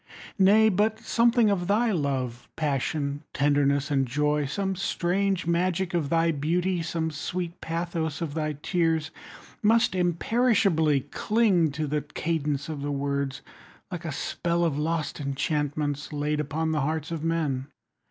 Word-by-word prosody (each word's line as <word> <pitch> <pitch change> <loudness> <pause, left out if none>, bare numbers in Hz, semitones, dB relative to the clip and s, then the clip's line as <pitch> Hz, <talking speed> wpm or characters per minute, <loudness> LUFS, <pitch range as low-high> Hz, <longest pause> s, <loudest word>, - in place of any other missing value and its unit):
20 190 -1 +6
Nay, 220 +1 +6
but 215 +2 +2
something 235 -1 +3
of 175 -3 -1
thy 220 +3 +2
love, 130 - -2
Passion, 145 -1 -1
tenderness, 140 0 +2
and 135 -2 +2
joy, 150 +2 +1
Some 195 +6 -2
strange 185 +1 0
magic 175 +2 0
of 160 -5 0
thy 165 +1 +3
beauty, 170 +4 0
Some 165 -1 -2
sweet 175 +3 -4
pathos 165 -2 -2
of 160 -4 -3
thy 155 -1 -1
tears, 165 -3 +1 0.5
Must 225 0 +4
imperishably 175 - +2
cling 185 - +2
25 - - -7
To 150 +1 -2
the 150 +1 0
cadence 150 -1 -2
of 155 -3 -5
the 145 +1 -2
words, 140 0 -2 0.5
Like 180 -1 -5
a 160 - -2
spell 170 +5 -1
of 160 -4 0
lost 160 0 -2
enchantments 145 0 -2
Laid 150 0 -1
upon 160 +2 -1
the 155 -2 0
hearts 155 +2 -2
of 160 -2 -3
men. 155 -5 -1
160 Hz, 150 wpm, -26 LUFS, 145-180 Hz, 0.5 s, 20